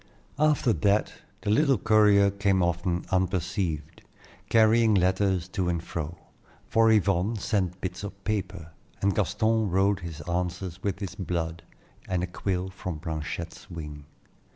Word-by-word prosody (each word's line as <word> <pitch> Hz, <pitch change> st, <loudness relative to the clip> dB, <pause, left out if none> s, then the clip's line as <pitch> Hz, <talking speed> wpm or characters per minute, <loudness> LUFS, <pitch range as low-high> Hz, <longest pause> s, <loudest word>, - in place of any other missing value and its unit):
After 150 Hz, -6 st, +3 dB
that 105 Hz, 0 st, +1 dB, 0.3 s
the 105 Hz, -, -1 dB
little 135 Hz, +2 st, +4 dB
courier 100 Hz, -1 st, +5 dB
came 100 Hz, -2 st, +1 dB
often 85 Hz, 0 st, -1 dB
unperceived, 90 Hz, -4 st, -1 dB, 0.5 s
carrying 110 Hz, 0 st, +5 dB
letters 95 Hz, -1 st, +2 dB
to 95 Hz, -2 st, -1 dB
and 85 Hz, -1 st, -1 dB
fro; 80 Hz, +1 st, -5 dB, 0.5 s
for 115 Hz, 0 st, +4 dB
Yvonne 100 Hz, 0 st, +2 dB
sent 95 Hz, -3 st, -1 dB
bits 90 Hz, +1 st, -4 dB
of 100 Hz, -1 st, -8 dB
paper, 95 Hz, -6 st, -3 dB, 0.3 s
and 100 Hz, 0 st, +2 dB
Gaston 110 Hz, +2 st, +1 dB
wrote 95 Hz, +2 st, +2 dB
his 85 Hz, -3 st, -7 dB
answers 90 Hz, +1 st, -3 dB
with 100 Hz, -2 st, -1 dB
his 95 Hz, -2 st, -4 dB
blood 85 Hz, -3 st, -3 dB, 0.5 s
and 90 Hz, -1 st, 0 dB
a -, -, +1 dB
quill 90 Hz, +1 st, -3 dB
from 90 Hz, -3 st, -5 dB
Blanchette's 80 Hz, 0 st, -5 dB
wing. 75 Hz, -3 st, -8 dB
95 Hz, 135 wpm, -27 LUFS, 85-105 Hz, 0.5 s, courier